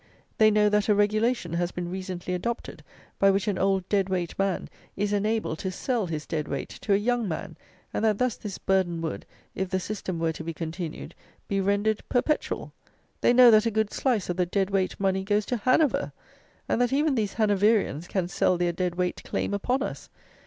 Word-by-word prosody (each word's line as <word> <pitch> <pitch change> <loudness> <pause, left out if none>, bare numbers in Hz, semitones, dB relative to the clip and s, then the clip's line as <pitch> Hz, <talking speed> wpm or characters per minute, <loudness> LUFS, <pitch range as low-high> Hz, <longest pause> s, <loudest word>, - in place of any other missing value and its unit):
They 215 0 +7
know 210 0 +4
that 210 0 +2
a 210 - +5
regulation 210 -2 +1
has 175 0 0
been 175 -1 -4
recently 185 -1 -4
adopted, 230 +7 -4 0.4
by 195 - +5
which 195 +2 +1
an 200 -3 0
old 190 -1 +1
dead 195 -2 +1
weight 180 -3 -1
man 195 -2 0 0.3
is 205 +1 0
enabled 210 -5 0
to 190 - -2
sell 225 +2 -1
his 155 -2 -4
dead 150 -2 -3
weight 140 - -4
to 205 - -2
a - - +4
young 235 +1 0
man; 160 - -5 0.4
and - - -1
that 215 -2 +3
thus 250 -1 +1
this 205 -4 -7
burden 185 -3 +1
would, 160 - -4 0.3
if 190 -1 -3
the 190 - 0
system 185 -2 -4
were 165 0 0
to 165 - -7
be 165 0 -5
continued, 165 0 -5 0.3
be 195 -1 0
rendered 205 +2 +1
perpetual. 300 +5 -1 0.5
They - - +5
know 245 -1 +8
that 215 +1 +5
a - - +3
good 220 -1 0
slice 245 -7 0
of 180 - -2
the 180 - +2
dead 195 +2 0
weight 190 -1 0
money 190 -1 +1
goes 205 +1 +1
to 245 - -1
Hanover; 255 +6 +2 0.5
and 240 - +1
that 245 - +2
even 290 +2 +2
these 215 -6 -1
Hanoverians 205 - +2
can 185 -3 -1
sell 180 0 +1
their 175 0 0
dead 180 0 -2
weight 180 0 -1
claim - - -2
upon 250 +7 0
us. - - -6
195 Hz, 205 wpm, -26 LUFS, 180-215 Hz, 0.5 s, know